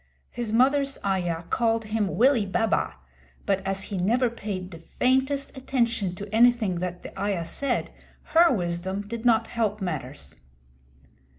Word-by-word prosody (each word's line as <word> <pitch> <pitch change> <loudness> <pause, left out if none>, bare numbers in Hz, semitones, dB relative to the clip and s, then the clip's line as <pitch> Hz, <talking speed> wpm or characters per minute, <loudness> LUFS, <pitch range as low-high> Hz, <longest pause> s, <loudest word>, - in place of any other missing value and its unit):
His 235 -2 -4
mother's 275 +4 +3
ayah 175 -4 -1
called 225 -1 +1
him 215 -2 -1
Willie 240 -4 +4
Baba, 215 +3 0 0.5
but 195 -1 +1
as 195 0 -1
he 200 -3 -4
never 235 +6 +2
paid 195 -5 -5
the 165 - -9
faintest 265 - 0
attention 235 -8 0
to 205 +3 -8
anything 225 -6 +4
that 180 0 -4
the - - -9
ayah 195 -4 -1
said, 265 +8 -2 0.4
her 335 +1 +6
wisdom 190 0 -2
did 230 +2 -6
not 230 -1 +4
help 215 -3 -1
matters. 145 - -5
215 Hz, 140 wpm, -26 LUFS, 185-240 Hz, 0.5 s, her